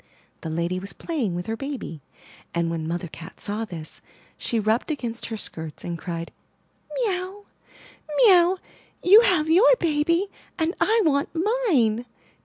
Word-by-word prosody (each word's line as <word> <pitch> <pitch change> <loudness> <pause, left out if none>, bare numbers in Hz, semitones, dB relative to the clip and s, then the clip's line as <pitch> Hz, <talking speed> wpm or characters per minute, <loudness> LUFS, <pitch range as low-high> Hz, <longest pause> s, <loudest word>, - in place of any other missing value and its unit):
The 160 - -5
lady 170 +3 -1
was 195 +2 -6
playing 260 - -2
with 175 0 -4
her 225 - -2
baby, 265 - -6 0.5
and, 170 -1 +1
when 160 -1 -3
Mother 175 +1 -3
Cat 160 0 -11
saw 210 +2 -1
this, 165 -6 -9 0.3
she 230 - -1
rubbed 220 +6 +1
against 240 -6 -4
her 225 - -4
skirts 160 -6 -5
and 175 - -3
cried: 170 0 -5 0.6
''Mee 430 -7 0
ow, 385 +3 -8 0.7
mee 450 -6 +8
ow! 355 +1 +5 0.5
You 405 +5 +9
have 355 -9 +3
your 375 +10 +6
baby, 335 -1 +1 0.3
and 325 +1 0
I 445 0 +4
want 280 -2 +2
mine! 325 - +1
250 Hz, 155 wpm, -24 LUFS, -, 0.7 s, You